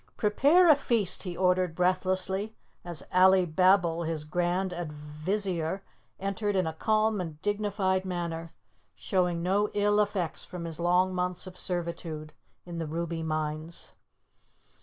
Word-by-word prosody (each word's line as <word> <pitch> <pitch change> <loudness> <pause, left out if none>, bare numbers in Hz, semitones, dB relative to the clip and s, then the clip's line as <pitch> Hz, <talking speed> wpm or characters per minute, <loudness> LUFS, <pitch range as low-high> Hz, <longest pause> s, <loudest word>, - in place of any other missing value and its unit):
"Prepare 285 +12 +4
a 310 - +8
feast," 230 -8 0
he 180 -2 -5
ordered 180 -2 +2
breathlessly, 185 +3 0 0.3
as 170 -5 -5
Alibabble, 185 -1 +4
his 160 -2 -2
Grand 175 +4 -1
Advizier, 170 +3 -3 0.4
entered 200 +1 -1
in 185 -2 +2
a 160 - -2
calm 215 +3 +1
and 160 -4 -6
dignified 205 -2 0
manner, 170 -3 -4 0.4
showing 175 - 0
no 200 +3 +2
ill 205 0 +3
effects 200 -5 -1
from 175 -2 -7
his 165 -1 -4
long 180 +2 +3
months 180 0 -2
of 185 -1 -10
servitude 170 -4 -4 0.3
in 170 -1 -6
the 165 - -3
ruby 165 +1 -3
mines. 155 +1 -3
180 Hz, 130 wpm, -29 LUFS, 165-195 Hz, 0.4 s, a